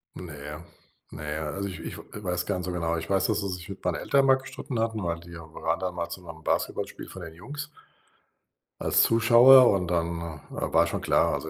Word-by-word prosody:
Ne. 75 -2 -8 0.5
Ne. 75 0 -4
Also, 100 +1 -3
ich 90 - -8
ich - - -7
w - - -8 0.2
weiß 90 -1 -1
gar - - -1
nicht 90 - -4
so 90 - -3
genau. 85 -1 -1
Ich 85 +2 -6
weiß, 95 -1 +2
dass 110 -1 0
er 100 - -3
sich 90 0 -6
mit 95 - -8
meinen - - +1
Eltern 140 -1 +2
mal 135 -1 +6
gestritten 130 -2 -6
hatten, 110 -3 -1
weil 85 -1 -2
die 85 +1 -13
waren 80 +1 -3
dann 90 -1 -3
mal 85 -1 -3
zu 90 +2 -7
'nem 80 -2 -11
Basketballspiel - - -2
von 95 - -10
den 85 -1 -8
Jungs 145 - -8 1.1
als - - +3
Zuschauer, 120 +3 +7
und 90 -3 0
dann 85 -1 0 0.3
wa - - -4
war - - +5
schon - - -3
klar, - - +3
also 80 - -3
90 Hz, 220 wpm, -27 LUFS, 85-110 Hz, 1.1 s, Zuschauer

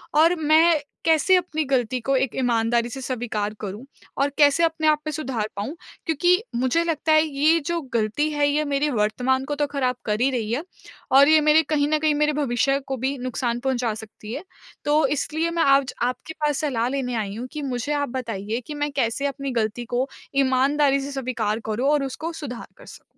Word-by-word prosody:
और 330 +3 +5
मैं 315 +1 +4 0.3
कैसे 325 +3 +4
अपनी 325 -3 -1
गलती 255 -2 0
को 270 +4 0
एक 260 -2 -1
ईमानदारी 235 -1 +1
से 265 - -7
स्वीकार 230 -5 -3
करूँ 210 +4 -6 0.3
और 280 +1 +2
कैसे 290 +2 +5
अपने 320 -1 +1
आप 305 -1 +4
में - - -1
सुधार 260 -8 -3
पाऊँ? 210 +10 -4 0.3
क्योंकि 350 +5 +2
मुझे 260 +7 +1
लगता 320 -1 0
है 310 0 +6
ये 310 +3 +2
जो 340 0 0
गलती 230 +7 0
है 290 -1 +2
ये 300 +1 +1
मेरे 285 +1 0
वर्तमान 250 +4 0
को 290 - -3
तो 290 0 0
ख़राब 260 -3 -1
कर 210 +1 -1
ही 260 - +4
रही 225 -4 -2
है 285 - -1 0.5
और 275 +1 +7
ये 315 0 +6
मेरे 305 +1 +5
कहीं 290 -1 +2
न 310 0 +2
कहीं 310 0 +2
मेरे 300 +1 +2
भविष्य 275 -1 +1
को 265 -1 -2
भी 265 +3 -2
नुकसान 245 -1 -2
पहुँचा 250 -3 0
सकती 220 0 -9
है। 285 +7 -5 0.4
तो 295 +1 +3
इसलिए 315 +4 -1
मैं 335 -1 +1
आज 275 -1 +3
आपके 250 +6 -3
पास 295 -2 +1
सलाह 250 -6 0
लेने 260 -2 -2
आई 205 -3 -3
हूँ 240 +3 -5
कि 305 - -4
मुझे 265 +1 -2
आप 285 -3 -1
बताइए 230 -2 -4
कि 300 - -5
मैं 290 0 -2
कैसे 270 0 -1
अपनी 275 -1 -4
गलती 220 +3 -3
को 255 +2 +1 0.3
ईमानदारी 275 +1 +3
से 280 +1 -5
स्वीकार 235 -5 -2
करूँ 230 +6 0
और 295 -1 +2
उसको 315 +5 -5
सुधार 270 -7 -7
कर - - -15
सकूँ? - - -13
275 Hz, 205 wpm, -23 LUFS, 240-300 Hz, 0.5 s, और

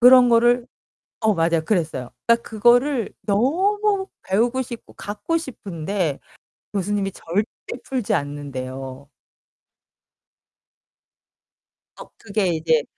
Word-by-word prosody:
그런 250 0 +8
거를 240 +1 +4 0.5
어 220 -2 +3
맞아요. 165 -1 +2
그랬어요. 160 - -1 0.2
딱 235 0 +4
그거를 240 +2 +3
너무 385 - +2 0.2
배우고 235 +7 +1
싶고 235 -2 -9
갖고 205 +11 -3
싶은데 190 - -3 0.5
교수님이 200 0 -1
절대 205 +7 -3
풀지 255 -5 -1
않는대요. 135 -1 -5 2.9
어 - - -8
그게 200 -1 -1
이제 160 -2 +2
205 Hz, 210 characters per minute, -22 LUFS, 165-245 Hz, 2.9 s, 그런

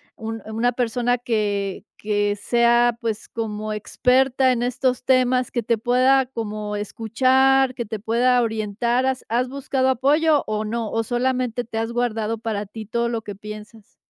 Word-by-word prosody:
un 225 0 -6
una 225 +3 0
persona 245 0 0
que 205 -5 -2
que 205 -1 0
sea 235 +2 +3
pues 225 -2 -3
como 215 -1 -4
experta 255 +4 +2
en 240 -2 0
estos 250 +1 0
temas, 255 -1 +2
que 240 - -2
te 230 0 0
pueda 255 +3 +3
como 215 -4 -5
escuchar, 255 +5 +2
que 240 -2 -4
te 220 +1 -5
pueda 240 +4 +2
orientar. 225 +3 0
¿Has 265 -1 -2
has 245 +3 0
buscado 265 -1 -1
apoyo 290 +4 +3
o 215 0 -2
no? 225 0 -3
¿O, 225 - 0
solamente 245 0 -1
te 225 -1 -5
has 225 +1 -2
guardado 230 -2 -1
para 215 -2 -3
ti 215 +2 -8
todo 235 +2 -1
lo 230 -1 -3
que 205 - -6
piensas? 210 +1 -11
235 Hz, 160 wpm, -22 LUFS, 215-255 Hz, -, sea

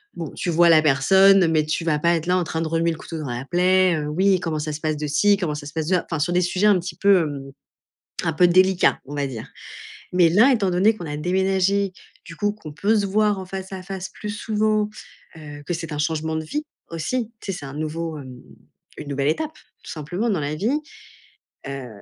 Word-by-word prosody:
bon, 165 -4 -5
tu 175 - -3
vois 170 +1 +5
la 160 -1 +7
personne 190 +6 +5
mais 155 -1 +2
tu 155 +2 -2
vas 150 -2 +2
pas 170 +2 +3
être 165 +1 -4
là, 180 +1 +3
en 180 - +1
train 160 0 -3
de 165 - -1
remuer 165 +1 +1
le 160 - -5
couteau 165 - -8
dans 145 -4 -5
la 120 +2 -4
plaie: 180 +1 +3
«heu, 150 -1 -3
oui 190 +3 +2
comment 160 -2 -2
ça 155 0 -3
se 150 - -5
passe 155 -1 -1
de 150 0 -3
ci, 200 +8 +3
comment 160 -6 -2
ça 145 -1 -7
se 145 - -9
passe 160 -1 -2
de 185 - +3
ça?» 175 - -1
Enfin, 160 - -1
sur 175 +4 0
des 180 - +3
sujets 185 +4 +1
un 200 -3 +5
petit 175 -1 -6
peu, 200 -3 +4
hem, 140 -3 -5 0.7
un 165 - +1
peu 180 +2 +5
délicats, 185 +1 +3
on 145 - -8
va 140 -1 0
dire. 115 -5 -7 0.7
Mais 180 -2 +5
là, 225 +10 +5
étant 205 -6 +1
donné 195 +5 +4
qu'on 175 - -8
a 150 -1 -4
déménagé, 190 +3 +1 0.3
du 165 - -10
coup, 205 +2 0
qu'on 160 -8 -11
peut 210 +7 +1
se 200 - +1
voir 205 0 +1
en 190 - -7
face 190 +1 -7
à 185 - -6
face 190 0 -6
plus 210 - -8
souvent, 215 0 0 0.5
heu, 145 -1 -10
que 175 - -2
c'est 165 -2 -5
un - - -4
changement 160 0 -1
de 160 - -2
vie 300 - -3 0.3
aussi. 220 +9 -3
Tu 195 - -4
sais, 180 - -6
c'est 145 - -9
un 135 - -8
nouveau, 155 +2 -4
hem, 130 -2 -11 0.6
une 145 - -8
nouvelle 140 +1 0
étape 310 - -2 0.3
tout - - -8
simplement 175 +9 -3
dans 190 -7 0
la 145 +1 -3
vie. 235 - 0 0.9
Heu, 135 -2 -6
170 Hz, 245 wpm, -22 LUFS, 155-195 Hz, 0.9 s, la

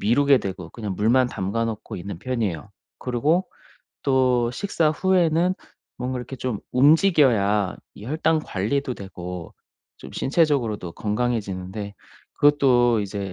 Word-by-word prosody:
미루게 140 +5 +4
되고 95 -5 -6
그냥 105 -4 -5
물만 120 +4 +3
담가 100 +4 -2
놓고 110 -2 -6
있는 90 0 -7
편이에요. 105 - -3 0.3
그러고 150 +9 0 0.6
또 130 -3 +3
식사 165 -5 0
후에는 180 0 +2 0.4
뭔가 125 0 -3
이렇게 130 +2 -8
좀 125 -5 -3
움직여야 125 - +4 0.2
이 105 - -11
혈당 160 +2 +1
관리도 125 +7 -2
되고 90 -4 -8 0.5
좀 65 - -11
신체적으로도 130 - 0
건강해지는데 105 -3 -3 0.4
그것도 125 -6 +4
이제 100 -1 -4
120 Hz, 290 characters per minute, -23 LUFS, 100-140 Hz, 0.6 s, 미루게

